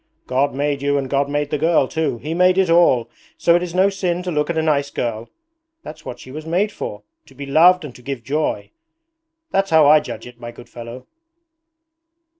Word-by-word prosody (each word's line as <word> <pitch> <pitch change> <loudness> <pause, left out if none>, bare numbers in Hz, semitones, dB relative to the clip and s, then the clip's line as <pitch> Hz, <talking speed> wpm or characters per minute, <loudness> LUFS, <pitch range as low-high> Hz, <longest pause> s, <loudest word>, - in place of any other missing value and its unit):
God 135 +2 0
made 145 0 -1
you 145 0 +1
and 135 -1 -2
God 140 +1 0
made 145 0 -2
the 150 - -1
girl 160 -3 +3
too. 160 -5 -2
He 155 +7 -5
made 180 +1 +3
it 190 -3 +2
all; 165 -9 +4 0.3
so 170 - +3
it 175 - +2
is 180 -1 -5
no 190 +2 +4
sin 180 -2 -2
to 180 - -3
look 150 -1 -1
at 170 - -2
a 160 - +1
nice 145 -3 +1
girl. 115 -3 -4 0.5
That's 155 0 -10
what 125 - -8
she 130 - -12
was 155 +3 -7
made 180 +6 0
for; 105 - -7 0.2
to 135 - -18
be 140 +2 -7
loved 165 +5 +4
and 135 - -9
to 125 - -15
give 130 -1 -6
joy. 150 +6 -2 0.8
That's 195 0 +1
how 160 -2 +5
I 150 +2 +7
judge 115 -6 -8
it, 120 -1 -13
my 120 0 -7
good 120 - -14
fellow.' 120 +1 -9
150 Hz, 220 wpm, -20 LUFS, 130-170 Hz, 0.8 s, I